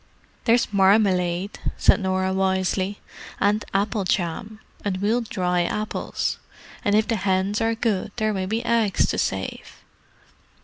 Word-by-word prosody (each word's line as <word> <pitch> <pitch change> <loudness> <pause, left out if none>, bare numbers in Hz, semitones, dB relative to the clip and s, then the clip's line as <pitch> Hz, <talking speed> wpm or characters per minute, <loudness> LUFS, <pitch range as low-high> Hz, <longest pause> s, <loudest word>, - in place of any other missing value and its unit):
"There's 230 -2 +3
marmalade," 190 -2 +2 0.2
said - - +4
Norah 190 -1 0
wisely. 190 +1 0 0.4
"And 210 +2 +2
apple 200 +1 0
jam—and 190 +2 -3
we'll 215 +5 +1
dry 180 -5 0
apples. 210 +5 -2 0.4
And 205 -3 +2
if 215 +1 +3
the 230 - 0
hens 190 +2 0
are 225 0 +1
good 215 -3 -1
there 215 -2 0
may 190 -1 -2
be 220 +4 -2
eggs 225 -4 +2
to - - -1
save." - - -4
200 Hz, 130 wpm, -23 LUFS, 190-215 Hz, 0.4 s, said